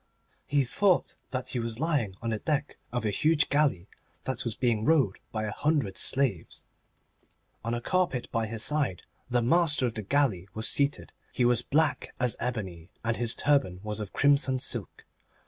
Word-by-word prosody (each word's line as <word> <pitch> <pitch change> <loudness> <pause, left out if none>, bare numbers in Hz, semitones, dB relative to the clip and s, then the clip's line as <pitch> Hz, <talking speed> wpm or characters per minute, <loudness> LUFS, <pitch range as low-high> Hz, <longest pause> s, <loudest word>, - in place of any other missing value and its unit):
He 140 -1 +2
thought 185 +9 +1 0.2
that 130 -1 -4
he 125 - -2
was 115 0 -3
lying 145 - 0
on 115 - -1
the 110 - -2
deck 150 +1 -2
of 120 -2 -2
a 105 - +1
huge 155 +7 +2
galley 140 - +1 0.4
that 130 -3 -2
was 115 -3 -2
being 115 -4 0
rowed 135 -9 +2
by 110 -1 -3
a 105 - -3
hundred 145 -8 0
slaves. 130 -9 -1 1.0
On 115 +1 -1
a 120 - -4
carpet 175 -5 0
by 115 -1 -1
his 110 0 0
side 145 - +2 0.3
the 120 -1 +1
master 155 +1 +3
of 120 - -1
the 110 - -4
galley 105 -5 +1
was 110 +1 -1
seated. 140 0 0 0.2
He 125 - +1
was 120 -1 +3
black 150 +4 0
as 125 -2 +2
ebony, 95 -9 -4
and 115 0 0
his 120 -2 +2
turban 135 -12 +1
was 105 0 -3
of 105 -2 -5
crimson 140 -2 +3
silk. 130 - -2
125 Hz, 180 wpm, -28 LUFS, 110-145 Hz, 1.0 s, master